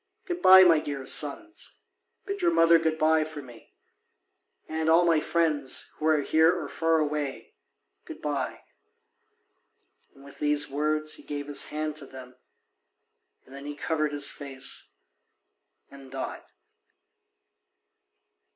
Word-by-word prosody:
Good 355 -1 -5
bye, 190 0 +9
my 165 -4 +5
dear 140 -3 -6
sons, 150 - -2 0.5
bid 400 0 -5
your 345 - +3
mother 165 - +5
good 160 -1 -1
bye 155 0 +3
for 155 -1 -8
me. 120 -3 -16 0.9
And 160 0 -2
all 170 +2 +5
my 165 -2 +3
friends, 155 -4 -1
who 155 - -2
are 155 -2 +3
here 160 +3 +4
or 155 - -6
far 165 +2 0
away, 150 -3 -3 0.5
good - - -10
bye." 140 -4 -4 1.5
And 140 - -17
with 140 - -15
these 150 0 +1
words 155 +2 -1
he - - -13
gave 145 -1 -6
his 145 0 +1
hand 155 0 -4
to 140 -3 -6
them, 130 -1 -12 1.1
and 130 - -17
then 140 +1 -9
he 145 - -6
covered 155 0 -2
his 145 -1 +3
face 135 - -5 1.0
and 140 -1 -13
died. 135 0 -6
150 Hz, 135 wpm, -26 LUFS, 140-160 Hz, 1.5 s, bye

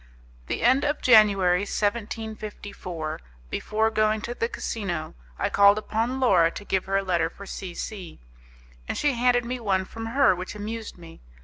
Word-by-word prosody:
The - - -3
end 260 +4 +4
of 290 0 -1
January, 200 -6 +5
1754, 205 - -4 0.3
before 220 +1 0
going 215 0 +1
to 235 - -4
the 230 -1 -2
casino, 175 -12 -4 0.2
I - - -1
called 200 +1 +6
upon 225 +4 -2
Laura 185 -10 +4
to 205 - -9
give 190 -2 0
her 195 +1 0
a 195 - 0
letter 170 -4 +1
for 200 - -12
C 185 -2 -7
C, 185 -5 -6 0.7
and - - -3
she 290 -2 +2
handed 245 0 +2
me 250 +1 -3
one 190 -4 0
from 225 +3 -7
her 260 -3 +4
which 185 +3 -6
amused 220 +1 -6
me. 165 -2 -13
210 Hz, 170 wpm, -25 LUFS, 190-230 Hz, 0.7 s, called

